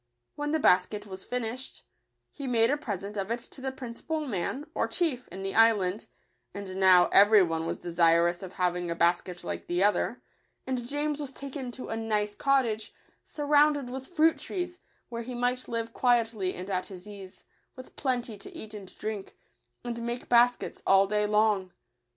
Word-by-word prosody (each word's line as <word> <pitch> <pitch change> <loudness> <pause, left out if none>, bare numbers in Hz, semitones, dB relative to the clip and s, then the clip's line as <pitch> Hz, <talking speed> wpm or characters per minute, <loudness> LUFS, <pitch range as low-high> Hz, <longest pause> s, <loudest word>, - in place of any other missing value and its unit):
When 295 0 -3
the 315 - +3
basket 205 -4 +3
was 190 -2 -8
finished, 250 +1 -5 0.5
he 280 -2 -7
made 230 -1 +3
a - - +3
present 205 -7 -5
of 195 +1 -2
it 235 +1 -2
to 265 - -13
the 265 0 -2
principal 265 +5 -5
man, 245 +6 -2
or - - 0
chief, 290 -8 -1
in 190 +1 -8
the 195 - -3
island; 215 -3 +3 0.5
and 200 -2 -6
now 185 -2 +7
every 205 0 +7
one 165 -1 -2
was - - -2
desirous 170 0 +3
of 190 -1 -8
having 180 -1 -1
a 170 - -1
bas 170 +1 +3
ket 180 -1 -9
like 85 -1 -5
the 175 +2 +1
other; 210 +3 +1 0.4
and 255 -2 -3
James 295 +2 -1
was 280 -3 -5
taken 275 -1 -6
to 255 - -8
a - - -2
nice 210 -2 -1
cottage, 240 -5 0 0.3
surrounded 290 -3 +2
with 265 +1 -6
fruit 325 -2 +3
trees, 355 -1 -5 0.3
where 235 -1 -4
he 245 +1 -6
might 245 +1 -1
live 230 -1 -3
quietly 225 -6 +1
and 185 +2 -6
at 185 -1 -1
his 185 0 -11
ease, 195 -2 -11 0.3
with 255 0 -12
plenty 245 -6 -2
to - - -10
eat 215 0 -9
and 200 -3 -10
drink, 215 -2 -5 0.5
and 235 -1 -4
make 235 +1 -4
bas 245 +1 +5
kets - - -8
all 195 0 +6
day 210 +1 +1
long. 210 -3 +2
225 Hz, 185 wpm, -28 LUFS, 190-255 Hz, 0.5 s, now